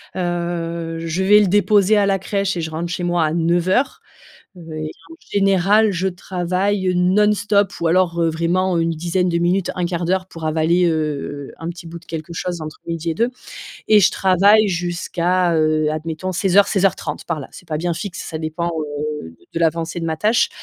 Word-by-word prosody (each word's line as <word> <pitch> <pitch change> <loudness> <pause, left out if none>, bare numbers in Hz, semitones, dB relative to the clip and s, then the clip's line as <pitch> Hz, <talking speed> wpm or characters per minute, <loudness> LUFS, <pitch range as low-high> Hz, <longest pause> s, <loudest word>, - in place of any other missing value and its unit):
Heu, 170 -2 -3
je 165 +3 -2
vais 210 +2 +6
le 205 - +3
déposer 205 +2 +4
à 205 -1 +3
la 195 -1 +1
crèche 195 0 -1
et - - -2
je 160 0 -4
rentre 165 +2 -4
chez 180 - -3
moi 175 -1 +1
à 155 0 0
09:00, 175 +9 +1 0.6
heu, - - -12
et 155 0 -4 0.2
en - - -9
général, 200 +2 +3
je 185 +1 -1
travaille, 185 +2 -1
heu, 180 - +1
non-stop, 205 +2 +2
ou 170 - +1
alors, 170 -1 +2
heu, 165 - +3
vraiment 175 +3 0
une 165 0 +1
dizaine 175 +3 -1
de 170 -1 +1
minutes, 175 +2 +1
1/4 175 -1 -2
d'heure 185 +2 0
pour 165 -3 -9
avaler, 160 +3 +2
heu 170 - +2 0.6
heu, - - -13
un 165 - -5
petit 170 0 -8
bout 170 +1 -8
de 170 - -21
quelque 160 0 -6
chose 175 0 -4
entre 155 0 -7
midi 165 0 -3
et - - -2
2 235 +5 +1 0.6
et 215 -1 +6
je 195 - +4
travaille 200 +3 +4
jusqu'à, 175 0 0
heu, 155 -1 +2
admettons, 160 +4 -4
16:00-16:30 190 -3 +1
par 165 -3 -2
là, 135 - -8
c'est 180 - -14
pas 155 - -2
bien 170 +2 -1
fixe, 185 +1 -5
ça 160 - -5
dépend, 160 +2 -3
heu, 150 - -5 0.2
de - - -2
l'avancée 165 +1 0
de 165 - -3
ma 160 -1 -1
tâche. 215 +7 +2
175 Hz, 200 wpm, -20 LUFS, 165-190 Hz, 0.6 s, vais